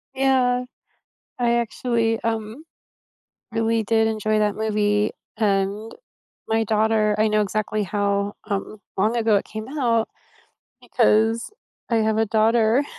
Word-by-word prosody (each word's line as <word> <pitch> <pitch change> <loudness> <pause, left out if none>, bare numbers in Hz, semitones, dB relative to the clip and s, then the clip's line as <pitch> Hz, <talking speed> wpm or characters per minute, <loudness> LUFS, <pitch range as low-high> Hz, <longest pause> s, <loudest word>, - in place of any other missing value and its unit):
Yeah, 255 -2 +2 0.7
I 235 -1 +2
actually, 230 -1 0
um, 225 +5 -3 0.9
really 225 0 0
did 220 +1 +2
enjoy 215 -1 0
that 210 -1 +1
movie, 210 -1 +1 0.3
and 205 +1 0 0.6
my 225 0 +1
daughter 215 0 +2
I 215 +1 +3
know 215 0 +2
exactly 210 +1 -1
how, 200 +1 -1
um, 205 +1 -4 0.2
long 215 +5 +1
ago 225 -2 +3
it 200 - +1
came 220 +2 -7
out, 230 -4 +1 0.7
because 225 +2 +2 0.4
I 230 - +2
have 220 0 +1
a 225 - +2
daughter 225 +4 +3
220 Hz, 125 wpm, -22 LUFS, 210-230 Hz, 0.9 s, I